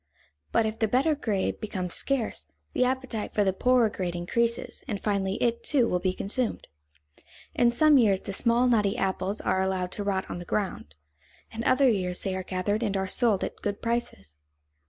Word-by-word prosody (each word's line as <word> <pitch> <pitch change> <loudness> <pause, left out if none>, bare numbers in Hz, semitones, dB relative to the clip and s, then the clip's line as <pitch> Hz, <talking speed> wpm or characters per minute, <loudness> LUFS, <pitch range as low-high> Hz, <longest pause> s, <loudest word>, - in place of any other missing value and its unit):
But 225 - +3
if 220 0 -3
the 220 - +2
better 265 +8 +2
grade 215 -9 -1
becomes 185 -5 -3
scarce, 235 - -1 0.3
the - - +2
appetite 255 -4 -2
for 210 - +3
the 190 -1 +1
poorer 250 +3 +3
grade 180 -4 -4
increases, 235 +7 -1
and 210 -6 -3
finally 195 -2 -1
it, 235 0 0
too, 260 -5 +2
will 180 - 0
be 185 +1 0
consumed. 230 +4 -2 0.9
In 240 - +4
some 295 +4 +5
years 200 -5 +3
the 200 - -6
small, 235 +4 +2
knotty 215 -3 +2
apples 195 0 -1
are 190 - +1
allowed 190 -1 -1
to 205 - -3
rot 195 -1 -1
on - - -5
the - - -6
ground; 175 - -3 0.6
in 225 +1 -5
other 270 +1 +4
years 185 -6 0
they 190 -1 -2
are 190 - -2
gathered 185 +4 -2
and 205 -4 0
are 190 - -1
sold 215 0 +2
at - - -5
good 205 -1 -2
prices. 165 - -3
210 Hz, 190 wpm, -27 LUFS, 190-235 Hz, 0.9 s, some